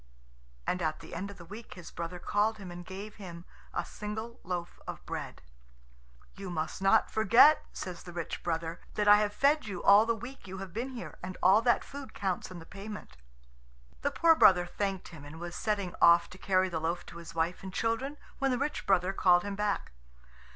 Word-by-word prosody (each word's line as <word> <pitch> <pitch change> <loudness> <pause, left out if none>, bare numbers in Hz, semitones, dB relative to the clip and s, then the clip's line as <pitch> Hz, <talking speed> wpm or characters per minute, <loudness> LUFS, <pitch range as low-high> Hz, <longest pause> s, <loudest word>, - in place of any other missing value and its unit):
And 180 - -1
at 155 -2 -1
the - - -11
end 200 - -4
of 200 - -10
the 170 - -11
week 215 +6 -10
his 180 -2 -10
brother 170 +1 -5
called 210 +5 +1
him, 190 -4 -8
and 175 0 -8
gave 200 +4 -8
him 175 -4 -9 0.3
a - - -2
single 220 +3 -6
loaf 175 -1 -4
of - - -7
bread. - - -6 0.9
"You 195 -1 -7
must 160 +1 -3
not 195 - +4
forget," 230 +8 +6
says 180 -2 -6
the 175 - -10
rich 170 -1 -4
brother, 165 0 -3
"that 210 -1 +1
I 205 0 +9
have 210 0 +1
fed 285 +4 +2
you 185 -4 -5
all 205 +3 +7
the 230 - +2
week 245 +1 -9
you 190 +1 -7
have 190 -2 -7
been 240 +5 -3
here, 245 -2 -8
and 185 0 -6
all 195 +4 +7
that 240 0 +3
food 280 -1 -9
counts 190 -3 -2
in 185 - -8
the 165 - -10
payment." 200 - -9 0.9
The - - +1
poor 330 +3 +5
brother 185 - +6
thanked 195 +1 -3
him, 160 -5 -11
and 150 +3 -10
was 175 0 -6
setting 200 -4 -1
off 170 +1 +6
to 185 - -12
carry 185 -1 +2
the 165 -3 -3
loaf 170 +2 -2
to - - -10
his 165 -1 -10
wife 165 +2 0
and 190 - -7
children 230 +8 -1 0.2
when 270 -1 +2
the 250 - +1
rich 290 +3 -2
brother 190 -1 +3
called 175 -2 +4
him 205 -1 -4
back. 210 0 -1
190 Hz, 210 wpm, -31 LUFS, 175-215 Hz, 0.9 s, I